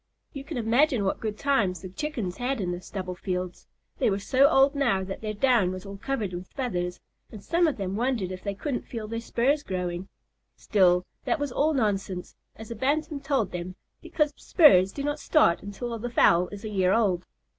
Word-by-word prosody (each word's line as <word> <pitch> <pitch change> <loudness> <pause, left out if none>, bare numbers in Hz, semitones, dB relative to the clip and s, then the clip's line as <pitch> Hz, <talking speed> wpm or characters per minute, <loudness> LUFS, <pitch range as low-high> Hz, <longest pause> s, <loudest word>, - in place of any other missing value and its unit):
You 275 - -6
can 290 0 -6
imagine 240 +1 +2
what 195 - -1
good 215 -1 -4
times 205 - +1
the 185 - -6
Chickens 220 - -4
had 255 +1 -1
in 180 -3 -1
the 175 0 -5
stubble 185 -1 -5
fields. 180 0 -4 0.3
They - - +3
were 195 - 0
so 260 +7 +4
old 275 -2 +4
now 240 -10 +1
that 190 0 -6
their 215 -1 -4
down 235 -4 +3
was 185 +1 -7
all 200 0 -8
covered 215 -4 -3
with 180 +1 -6
feathers, 180 -10 -3 0.3
and 210 -3 -10
some 340 - +2
of 305 - -1
them 195 -1 -3
wondered 230 -5 -1
if 185 0 -7
they 200 -1 -3
couldn't 255 +4 -4
feel 225 -3 -5
their 230 +1 -3
spurs 255 +5 +1
growing. 180 -3 -4 0.5
Still, 180 -3 +3 0.2
that 345 - +1
was 290 -3 -3
all 300 +4 +1
nonsense, 195 -6 -1 0.2
as 220 +1 -10
a - - -4
Bantam 290 +5 -1
told 275 -7 0
them, 180 +1 -5 0.3
because 300 -2 0
spurs 195 - +5
do 280 - -5
not 290 +1 -2
start 300 - +3
until 230 +4 -5
the 240 +3 -4
fowl 180 -6 +4
is 205 +1 -9
a - - -3
year 190 -2 +2
old. 190 -6 +1
215 Hz, 205 wpm, -27 LUFS, 185-275 Hz, 0.5 s, spurs